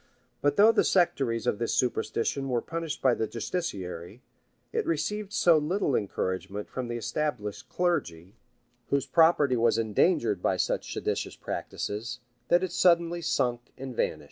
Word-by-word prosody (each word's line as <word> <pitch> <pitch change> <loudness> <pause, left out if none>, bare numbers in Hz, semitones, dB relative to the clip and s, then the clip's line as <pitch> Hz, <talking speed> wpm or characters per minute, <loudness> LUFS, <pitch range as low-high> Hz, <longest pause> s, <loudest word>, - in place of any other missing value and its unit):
[*] 120 -1 -42
But 145 0 +2
though 215 +3 +7
the - - +3
sectaries 135 - +1
of 105 - 0
this 115 - 0
superstition 125 +2 -1
were 120 -2 0
punished 165 -3 -4
by 130 -2 +5
the 110 - -1
justiciary,[] 105 - -5 0.5
it 455 -1 +1
received 210 -11 -2
so 170 -6 +4
little 150 -2 0
encouragement 95 0 -2
from 130 -2 -5
the 120 0 -3
established 115 -5 -3
clergy 100 - -1 0.6
whose 140 -1 +1
property 160 -5 +4
was 115 0 +3
endangered 115 - +2
by - - +1
such - - -1
seditious - - -2
practices, 110 +4 -4 0.3
that 175 +1 +4
it 185 - -2
suddenly 170 -1 +3
sunk 120 -7 -1
and 130 -1 -7
vanished. - - 0
130 Hz, 150 wpm, -28 LUFS, 115-170 Hz, 0.6 s, though